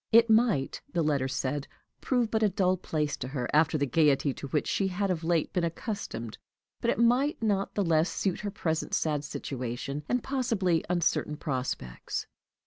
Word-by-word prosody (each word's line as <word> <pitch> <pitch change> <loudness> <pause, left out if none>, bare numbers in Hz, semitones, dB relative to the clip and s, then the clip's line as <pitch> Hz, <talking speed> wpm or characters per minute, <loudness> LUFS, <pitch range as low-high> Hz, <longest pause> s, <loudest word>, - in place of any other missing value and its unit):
It 230 0 +6
might, 220 - +3
the 170 -2 +1
letter 140 -4 +1
said, 135 +2 -2 0.3
prove 245 -4 +1
but 220 - +1
a 215 - +4
dull 185 -1 +2
place 150 -5 -2
to 125 - -5
her 130 -2 -3
after 155 +1 +4
the 145 - +1
gayety 140 0 +3
to 140 - -7
which 145 +2 0
she 195 - +1
had 190 +1 -1
of 170 -2 -2
late 165 -1 +1
been 180 -3 +1
accustomed, 165 - -4 0.4
but - - 0
it - - +1
might 245 +6 +3
not 200 -2 0
the 205 - +2
less 165 +1 +3
suit 190 -3 -1
her 210 - -3
present 160 -6 -1
sad 150 -2 0
situation, 135 0 -4
and 250 -1 +1
possibly 225 -11 +1
uncertain 170 -3 +1
prospects. 130 - -3
165 Hz, 180 wpm, -29 LUFS, 145-205 Hz, 0.4 s, It